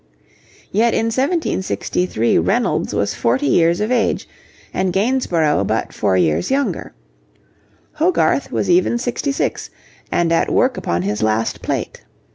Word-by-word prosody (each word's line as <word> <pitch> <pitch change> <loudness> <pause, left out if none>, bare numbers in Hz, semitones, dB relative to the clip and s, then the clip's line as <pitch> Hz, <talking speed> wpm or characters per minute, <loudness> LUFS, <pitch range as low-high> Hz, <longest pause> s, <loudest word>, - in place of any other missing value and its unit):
Yet 225 +3 +2
in 225 +1 0
1763 190 - 0
Reynolds - - 0
was 100 -2 0
forty 120 +8 0
years 165 +5 +3
of 210 +3 -1
age 240 -3 0 0.5
and 185 0 0
Gainsborough 190 - +1
but 110 +1 -2
four 95 -3 +1
years 85 - +1
younger. 275 +1 -1 1.0
Hogarth 335 +4 +1
was - - -1
even 350 -9 +3
sixty 245 +4 -2
six, 275 - -2 0.4
and 170 -1 +1
at 165 - +2
work 255 -1 +2
upon 85 +1 -2
his 105 +2 -2
last 110 +1 0
plate. - - -4
180 Hz, 130 wpm, -19 LUFS, -, 1.0 s, years